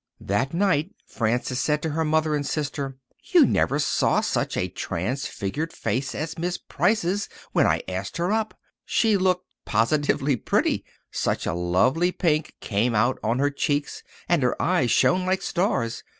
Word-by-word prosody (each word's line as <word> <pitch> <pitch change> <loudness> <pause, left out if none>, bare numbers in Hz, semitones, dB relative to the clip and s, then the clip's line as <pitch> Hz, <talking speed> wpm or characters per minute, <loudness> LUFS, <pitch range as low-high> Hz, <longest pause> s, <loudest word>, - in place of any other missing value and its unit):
That 105 +8 0
night 185 +1 +1
Frances 120 +2 -1
said 150 +1 0
to 160 - -1
her 160 +2 0
mother 155 0 +1
and 145 -1 0
sister, 140 -2 -3 0.2
"You 345 -6 +5
never 140 - +1
saw 150 - +2
such - - -1
a 90 - 0
transfigured 110 - -3
face 125 +4 -2
as 160 +1 -4
Miss 175 +1 -1
Price's 205 -1 0 0.2
when - - +3
I - - +1
asked 95 - -4
her 175 +3 0
up. 220 0 -1 0.3
She 220 -2 +2
looked 185 -1 +1 0.2
positively 135 +4 +1
pretty—such - - -1
a - - -1
lovely 95 - +2
pink 155 -4 0
came 115 +3 0
out 120 +4 +2
on 115 +3 +1
her 145 +2 +2
cheeks 145 +1 -1 0.3
and 170 -3 +2
her 125 - 0
eyes 170 -9 +2
shone 180 +10 +3
like 185 +1 0
stars. 120 - 0
145 Hz, 155 wpm, -24 LUFS, 120-175 Hz, 0.3 s, You